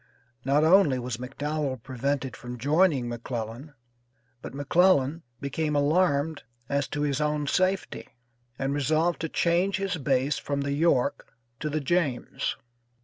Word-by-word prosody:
Not 140 +3 +3
only 160 -5 +5
was 125 -1 -4
McDowell 135 0 -3
prevented 135 0 -2
from 125 0 -8
joining 145 0 +2
McClellan, 120 +4 -5 0.7
but - - -8
McClellan 160 +1 +3 0.2
became 150 +2 -2
alarmed 150 0 +2 0.3
as 140 -1 0
to 145 - -4
his 145 0 0
own 150 0 0
safety, 185 +6 0 0.5
and 135 +1 -1
resolved 155 +4 +1
to 165 - -2
change 180 +5 +1
his 195 -2 -2
base 135 -1 +1
from 140 -1 -2
the 140 0 -1
York 145 -4 +1 0.3
to 150 - -2
the 155 +1 -1
James. 145 -4 -1
145 Hz, 135 wpm, -27 LUFS, 135-160 Hz, 0.7 s, only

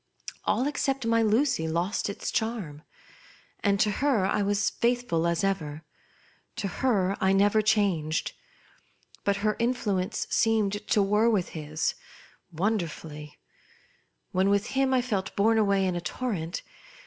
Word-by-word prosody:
All 255 - +1
except 275 -3 -1
my 230 0 +3
Lucy 220 - +2
lost 175 +6 -1
its 200 - -4
charm; 210 -10 -3 0.8
and 200 -1 +1
to 210 0 +3
her 265 -9 +2
I 205 +2 +1
was 200 0 +1
fiiithful 235 -9 0
as 170 +3 -1
ever; 160 -6 -2 0.7
to 200 - -2
her 195 -3 +1
I 190 0 +4
never 205 +2 +4
changed. 195 -8 +1 0.9
But 200 0 +1
her 215 - +2
influence 215 -6 -1
seemed 210 -2 +1
to 210 -4 +3
war 210 +4 +3
with 200 -6 +1
his 155 -1 -2 0.6
wonderfully. 160 -5 -3 0.9
When 190 +2 +2
with 200 +3 +1
him 270 0 +2
I 255 -1 +2
felt 205 -6 -2
borne 220 +2 +3
away 200 -2 +2
in 185 -1 0
a 175 - -2
torrent. 175 -2 -3
200 Hz, 135 wpm, -27 LUFS, 180-225 Hz, 0.9 s, I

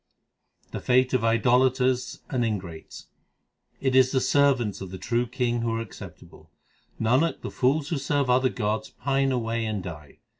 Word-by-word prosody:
The - - -4
fate 130 +1 +2
of 125 -3 +1
idolaters 125 +3 +2
and 125 -2 0
ingrates: 95 -8 -5 0.7
It 130 -1 0
is 130 -1 +5
the 130 - +2
servants 130 -8 +2
of 95 - -6
the 95 - -7
True 120 +4 -1
King 120 -1 -1
who 115 -1 -1
are - - -2
acceptable; 115 -3 -11 0.5
Nanak, 130 +9 +1
the - - -6
fools 140 +3 +1
who 160 - -1
serve 140 0 0
other 130 +1 +3
gods 105 +1 -2
pine 135 -1 0
away 115 -2 -1
and 105 -4 -3
die. 75 -5 -9
125 Hz, 160 wpm, -26 LUFS, 115-130 Hz, 0.7 s, is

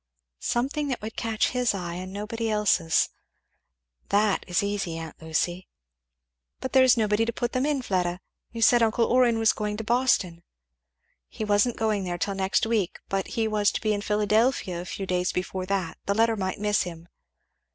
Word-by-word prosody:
"Something 275 +5 -1
that 255 -5 -3
would 220 +1 -6
catch 225 -1 0
his 250 -4 0
eye 175 -3 -4
and 185 +1 -6
nobody's 220 +3 -3
else 205 -6 +2 1.0
that 205 0 +2
is 180 +1 +1
easy, 200 -5 -2
aunt 165 0 -8
Lucy." 175 +3 -2 0.9
"But 260 - -5
there 260 -1 +7
is 255 -1 +5
nobody 215 0 +2
to 230 - -1
put 240 +1 -2
them 255 +2 0
in, 285 -4 0
Fleda, 180 -4 -1 0.3
you 230 -1 -2
said 240 +1 +6
uncle 230 +1 +3
Orrin 245 -2 +3
was 225 -1 +3
going 210 -1 -3
to 225 - -4
Boston 220 -8 +1 0.4
" 60 0 -47
"He 215 - -5
wasn't 210 +3 +2
going 215 -3 0
there 175 -1 -3
till 200 +3 -1
next 190 +2 +1
week, 220 -5 0
but 195 -1 -1
he 225 -1 +2
was 210 -2 +2
to - - -1
be 215 -1 +1
in 205 - -2
Philadelphia 210 -2 +1
a - - -8
few 195 - -5
days 180 -1 0
before 185 0 -3
that 185 -4 -2
the 200 - +1
letter 225 +1 +3
might 190 -2 -3
miss 210 0 +1
him." 170 -2 -7
210 Hz, 190 wpm, -26 LUFS, 185-230 Hz, 1.0 s, there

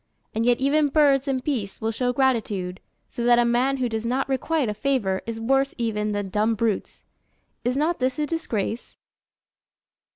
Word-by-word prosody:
And 225 +2 0
yet 245 -1 +3
even 290 +3 +3
birds 280 -2 +3
and 260 -2 -1
beasts 225 -10 -3
will 220 0 -1
show 245 +2 0
gratitude; 220 -8 0 0.3
so 240 - -4
that 240 0 +5
a 240 - +4
man 250 +3 +2
who 255 -2 0
does 225 -1 -3
not 255 +3 0
requite 275 +1 0
a 210 - -1
favour 210 -4 0
is 225 -1 -4
worse 270 +4 +1
even 215 -3 -1
than 205 -1 -2
dumb 215 +3 +1
brutes. 220 -2 -2 0.6
Is 250 +2 0
not 320 +4 +1
this 255 0 0
a 300 - 0
disgrace? 240 - -3
245 Hz, 175 wpm, -24 LUFS, 220-270 Hz, 0.6 s, that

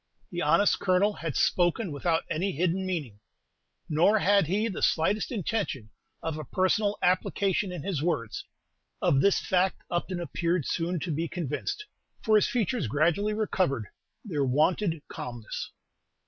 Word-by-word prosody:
The 175 -1 -3
honest 205 +2 +3
Colonel 190 +3 +3
had 165 -7 -5
spoken 175 +2 +2
without 160 +3 0
any 185 +5 -1
hidden 180 +4 0
meaning, 145 - -4 0.7
nor 170 +8 +4
had 200 -4 +3
he 205 +6 +1
the 200 - -4
slightest 200 +10 +1
intention 195 - -2 0.3
of 160 -1 -3
a - - -4
personal 195 - +1
application 185 +1 +1
in 180 - -6
his 185 -7 -2
words. 145 -10 -2 0.6
Of 135 - +3
this 200 - +4
fact 185 0 0
Upton 175 +1 -2
appeared 170 -2 -1
soon 170 +1 -1
to 175 - -2
be 160 +3 -1
convinced, 175 - -3 0.4
for 220 -2 +4
his 210 - +5
features 235 - 0
gradually 170 - +1
recovered 180 - 0 0.4
their 155 -9 -1
wonted 160 +5 +1
calmness. 120 -3 -6
175 Hz, 145 wpm, -28 LUFS, 155-200 Hz, 0.7 s, his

